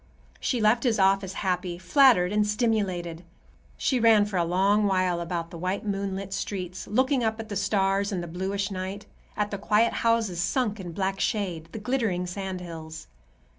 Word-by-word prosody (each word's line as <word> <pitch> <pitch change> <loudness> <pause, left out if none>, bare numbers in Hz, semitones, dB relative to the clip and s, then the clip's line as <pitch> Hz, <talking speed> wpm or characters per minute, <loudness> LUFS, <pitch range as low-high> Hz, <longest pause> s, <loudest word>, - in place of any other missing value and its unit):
She 250 - -1
left 220 +2 +3
his 240 -3 +1
office 195 -1 +2
happy, 180 -2 -2
flattered 185 -1 +4
and 210 0 +2
stimulated. 195 -7 -1 0.5
She 260 - +1
ran 225 -3 +5
for 205 -2 -3
a 175 - +3
long 195 +4 +2
while 185 -3 +1
about 170 -1 -4
the 170 - -8
white, 185 +4 -2
moonlit 195 -1 -3
streets, 185 -2 -4
looking 260 +3 +2
up 220 0 -1
at 225 0 -7
the 205 - -4
stars 200 0 +1
and 180 -3 -2
the - - -6
bluish 195 +4 -3
night, 190 +2 -5 0.3
at 210 0 -1
the 200 - -4
quiet 215 +3 +2
houses 225 -7 +1
sunk 210 +4 0
in 175 -2 -6
black 195 +2 -2
shade, 175 -6 -2
the - - -6
glittering 215 -6 -1
sand 185 0 -5
hills. 160 -2 -8
195 Hz, 175 wpm, -26 LUFS, 180-215 Hz, 0.5 s, ran